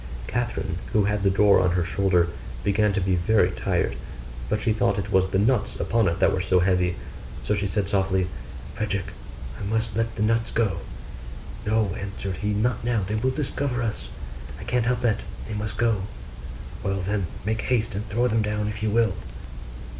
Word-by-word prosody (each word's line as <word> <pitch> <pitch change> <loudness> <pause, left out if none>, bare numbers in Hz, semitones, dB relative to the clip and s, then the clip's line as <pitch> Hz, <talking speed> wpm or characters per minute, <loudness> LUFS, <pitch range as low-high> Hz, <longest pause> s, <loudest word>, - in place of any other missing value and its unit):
Catherine, 115 - -2
who 105 - +4
had 105 +1 +1
the 100 - +3
door 100 +1 +5
on 90 - +3
her 90 -1 +1
shoulder, 90 -1 +2 0.3
began 105 +1 +3
to 100 - +1
be 95 0 +2
very 100 +5 +3
tired; - - 0 0.5
but 105 - +1
she 110 0 +1
thought 100 -2 +1
it 100 0 -3
was 95 -1 +4
the 95 - 0
nuts 120 +6 +2
upon 115 -3 +1
it 85 +1 0
that - - +4
were 95 - 0
so 90 0 +3
heavy: 90 -1 +2 0.5
so - - +1
she 100 -1 0
said 100 0 -1
softly, 95 -2 +1 0.5
'Frederick, 100 -3 -2 0.5
I - - -5
must 110 0 -1
let 115 0 0
the 105 - 0
nuts 115 +1 +2
go.' 110 -4 +1 0.9
'No,' 110 -3 +2
answered 100 -1 -4
he, 105 - -2
'not 115 +3 0
now, 115 -4 +1
they 100 +3 -3
will 110 +4 +1
discover 130 -2 -1
us.' 105 - -3 0.5
'I - - -7
can't 120 -2 0
help 125 -1 +1
that: 115 -3 +2 0.3
they 110 - -5
must 105 0 -3
go.' 115 -4 +2 0.8
'Well, 95 0 -1
then, 100 -1 -1 0.2
make 110 +1 0
haste 120 -4 0
and 105 +2 -4
throw 120 +4 +2
them 115 -1 +2
down, 105 0 -1
if 105 0 -4
you 110 - +1
will. 110 -2 +3
105 Hz, 190 wpm, -25 LUFS, 95-110 Hz, 0.9 s, door